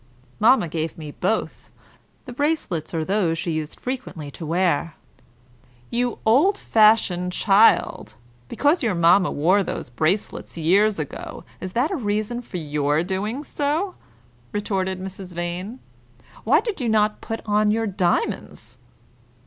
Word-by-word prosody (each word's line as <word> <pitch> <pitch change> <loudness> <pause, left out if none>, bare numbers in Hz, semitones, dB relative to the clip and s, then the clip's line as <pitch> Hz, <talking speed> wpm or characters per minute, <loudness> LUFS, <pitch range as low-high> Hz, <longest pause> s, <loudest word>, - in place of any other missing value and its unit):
"Mamma 220 -3 +5
gave 160 0 -4
me 155 -2 -7
both. 200 +8 -2 0.6
The 250 - -8
bracelets 250 - -1
are 160 -2 -2
those 185 -4 +1
she 170 +1 -2
used 155 -1 -4
frequently 245 - -5
to 160 +2 -8
wear." 170 -2 0 1.0
"You 245 0 -1
old 290 - +4
fashioned 210 - +3
child! 210 +3 +3 0.3
Because 295 +5 +2
your 225 -8 0
mamma 175 +2 +4
wore 180 +7 +2
those 165 - -5
bracelets, 165 - -1
years 195 +6 +3
ago, 150 -3 -6 0.2
is 185 0 -6
that 260 +9 +1
a - - 0
reason 215 - -2
for 205 - -7
your 150 -1 0
doing 205 +9 -3
so?" 305 +7 -1 0.6
retorted 190 -2 -2
Mrs. 190 -1 -8
Vane. 175 +7 -4 0.7
"Why 290 - +4
did 435 - -4
you 240 - 0
not 215 -1 +2
put 225 - -5
on 210 0 +2
your 225 +2 +1
diamonds?" 185 -4 -2
195 Hz, 135 wpm, -23 LUFS, 170-230 Hz, 1.0 s, Mamma